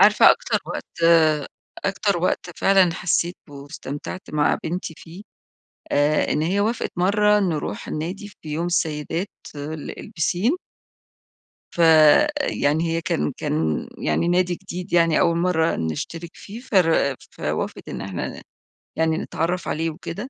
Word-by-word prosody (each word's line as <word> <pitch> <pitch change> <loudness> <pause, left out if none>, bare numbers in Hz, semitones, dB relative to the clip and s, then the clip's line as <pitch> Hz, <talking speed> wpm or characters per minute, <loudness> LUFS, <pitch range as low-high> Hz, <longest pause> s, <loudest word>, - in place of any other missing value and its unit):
عارفة - - +7
أكتر - - +1
وقت، 170 - -7
آآ، 155 -3 +5 0.4
أكتر 195 -1 +1
وقت 175 0 -1
فعلًا 190 -3 +4
حسّيت 175 0 0
به 145 - -12
واستمتعت 145 +4 -7
مع 150 -1 +2
بنتي 170 0 -3
فيه، 175 +5 -11 0.7
آآ، 145 +1 +2
إن 150 - 0
هي 185 +5 +1
وافقت 225 +3 -1
مرّة 210 +3 +3
نروح 170 -6 -2
النادي 185 +7 -4
في 160 -6 -14
يوم 165 +3 -1
السيدات، 165 +2 -1 0.3
ال 150 +1 -6
البِسِين 180 - 0 1.2
فيعني، 160 - +4
هي 165 0 0
كان 75 - -1
كان 80 0 -1
يعني 170 - 0
نادي 180 0 +2
جديد 180 0 -8
يعني 165 -2 +4
أول 170 -1 +3
مرة 170 -2 +1
نشترك 160 - -4
فيه، 215 +4 -10
فر 165 - +2 0.2
فوافقت - - -4
إن - - -5
إحنا 95 -3 -5 0.5
يعني 160 0 +1
نتعرف 175 +3 -2
عليه 165 +1 -1
وكده، 185 - -7
170 Hz, 135 wpm, -23 LUFS, 155-185 Hz, 1.2 s, عارفة